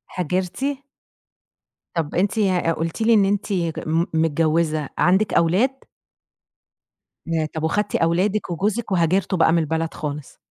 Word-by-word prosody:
هاجرتِ؟ 180 - -2 1.3
طَب، 160 -3 -2
أنتِ 200 +5 +1 0.4
قُلتِ 165 +6 -3
لي 230 +1 +4
إن 205 -3 +5
أنتِ 200 +1 -1
ك 170 -4 -1
م 165 +2 +1
متجوزة، 160 -1 +1
عندِك 190 +3 +2
أولاد؟ 180 +10 +3 1.6
ياه! 165 -1 0
طَب 160 - -3
وأخدتِ 205 +5 0
أولادِك 185 +5 +1
وجوزِك 210 +6 -2
وهاجرتوا 185 +2 +1
بقى 160 0 +4
من 170 - +3
البلد 160 +1 -2
خالص؟ 150 -2 -6
170 Hz, 125 wpm, -22 LUFS, 160-195 Hz, 1.6 s, إن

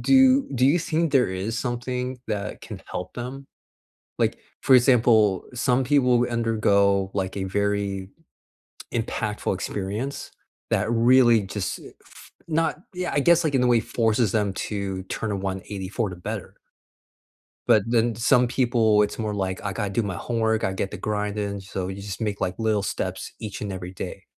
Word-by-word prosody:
Do 265 0 +5
do 130 0 +3
you 150 +6 +4
think 165 -1 0
there 125 -8 +4
is 100 +6 -3
something 125 +1 -3
that 105 -1 -3
can 105 -4 -9
help 90 - -5
them? 130 +3 -6 0.7
Like, - - +1 0.2
for 135 - +6
example, 115 -6 +4
some 125 +1 +1
people 125 -3 +3
undergo, 100 -4 +2
like, 95 0 -2
a 95 - -2
very 100 -1 -1 0.8
impactful 110 -3 -2
experience 105 +7 -4 0.4
that - - +1
really 120 0 +5
just 100 -1 -4
eh - - -12
f - - -16 0.2
not 165 -1 0
yeah. 180 0 -3
I - - +2
guess, 170 +3 +4
like, 155 - 0
in 130 - +3
a 125 - +3
way 120 -1 +4
forces 110 -2 +1
them 105 -3 0 0.2
to 100 -2 -3
turn 105 +3 -4
a - - -1
one 95 -1 -3
eighty 95 -2 -5
for 110 -1 -1
the 90 - -7
better. 90 - -6 1.1
But 105 - +5
then 115 0 +2
some 125 +3 +3
people, 115 -4 +3
it's 105 - -2
more 105 -2 -2
like, 95 -2 -3
"I 100 - -2
gotta 105 -2 -2
do 105 +4 0
my 100 -4 -3
homework. 110 0 0
I 95 - 0
get 95 0 -3
the - - -7
grind 105 -1 -2
in." 100 -1 -3
So, 95 -1 -5
you 95 +1 -6
just 100 0 -6
make, 105 -2 -2
like, 90 +3 -2
little 110 -3 +1
steps - - -4
each 105 -3 -6
and 100 -2 -3
every 90 0 -6
day, - - -7
110 Hz, 180 wpm, -24 LUFS, 100-125 Hz, 1.1 s, for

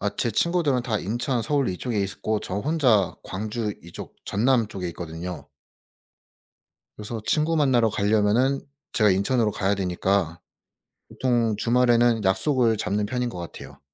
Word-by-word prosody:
아 105 - 0
제 120 - 0
친구들은 155 - +1
다 115 -3 -1
인천, 120 +5 -1
서울 140 +4 0
이쪽에 105 +4 -2
있고 105 +2 -2
저 95 - -4
혼자 125 - +2
광주 105 +2 -3
이쪽 85 0 -10
전남 120 +2 +2
쪽에 95 -4 -5
있거든요. 85 -2 -7 1.5
그래서 110 +2 -6
친구 160 +2 +1
만나러 130 -6 +3
가려면은 110 +6 +2 0.3
제가 105 -3 +4
인천으로 105 +4 +2
가야 100 0 0
되니까 90 -2 -1 0.7
보통 120 -4 +1
주말에는 120 -1 +3
약속을 115 +3 +2
잡는 105 +1 -1
편인 125 +2 -2
것 90 - -8
같아요. 85 -3 -9
110 Hz, 305 characters per minute, -24 LUFS, 100-125 Hz, 1.5 s, 제가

